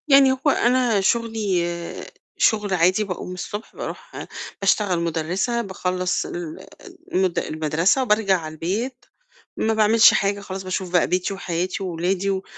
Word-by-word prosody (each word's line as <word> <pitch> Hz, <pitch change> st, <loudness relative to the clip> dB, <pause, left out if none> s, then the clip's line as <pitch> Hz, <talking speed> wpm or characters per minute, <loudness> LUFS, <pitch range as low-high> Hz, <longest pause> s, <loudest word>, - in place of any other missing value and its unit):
يعني 275 Hz, -2 st, +7 dB
هو 265 Hz, +3 st, +1 dB
أنا 240 Hz, -5 st, +2 dB
شُغلي 190 Hz, -6 st, -1 dB, 0.3 s
شُغل 210 Hz, -3 st, +2 dB
عادي، 185 Hz, +4 st, +3 dB
باقوم 180 Hz, -2 st, -5 dB
الصبح 205 Hz, +4 st, -7 dB
باروح -, -, -7 dB, 0.4 s
باشتغل 195 Hz, -2 st, +2 dB
مُدرِّسة، 170 Hz, +8 st, -1 dB
باخلّص 185 Hz, -3 st, -2 dB
ال 170 Hz, -2 st, -6 dB, 0.5 s
المد 185 Hz, -1 st, +2 dB
المَدرسة 160 Hz, -, +1 dB
وبارجع 210 Hz, -4 st, +3 dB
على 155 Hz, -1 st, -7 dB
البيت، 220 Hz, -, -3 dB, 0.5 s
ما 220 Hz, -, +1 dB
باعملش 220 Hz, +1 st, +6 dB
حاجة 200 Hz, 0 st, +1 dB
خلاص 190 Hz, -1 st, -6 dB
باشوف 185 Hz, -1 st, -3 dB
بقى 175 Hz, -1 st, +3 dB
بيتي 180 Hz, +2 st, 0 dB
وحياتي 185 Hz, 0 st, -3 dB
وولادي 185 Hz, +2 st, -1 dB
و 190 Hz, -1 st, -1 dB
190 Hz, 135 wpm, -22 LUFS, 175-220 Hz, 0.5 s, يعني